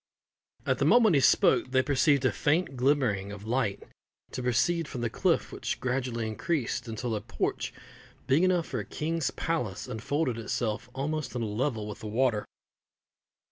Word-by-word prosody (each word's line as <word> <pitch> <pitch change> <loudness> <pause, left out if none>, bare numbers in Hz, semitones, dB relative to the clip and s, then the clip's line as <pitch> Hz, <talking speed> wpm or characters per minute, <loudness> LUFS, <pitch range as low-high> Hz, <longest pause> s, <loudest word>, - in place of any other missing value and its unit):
At - - +1
the - - +2
moment 225 -6 +6
he 140 - +4
spoke 130 - +4
they 130 0 +3
perceived 140 0 +3
a - - +4
faint 150 0 +1
glimmering 125 -7 +1
of 105 0 -9
light 115 -3 -1 0.5
to 130 - -4
proceed 150 +7 +1
from 125 - -5
the 120 -2 -1
cliff, - - +1
which - - -3
gradually 125 -2 -1
increased 125 +1 -2
until 115 +1 -3
a 105 - -3
porch 115 +2 -2 0.5
big 135 +5 +3
enough 180 -3 +3
for 125 - -4
a - - -3
king's 155 +6 -2
palace 125 - -3
unfolded 125 +2 -1
itself 115 0 -2
almost 150 +1 -3
on 120 - -1
a - - 0
level 110 0 -2
with 105 - -7
the 110 - -7
water. 115 -1 +1
125 Hz, 170 wpm, -29 LUFS, 110-145 Hz, 0.5 s, moment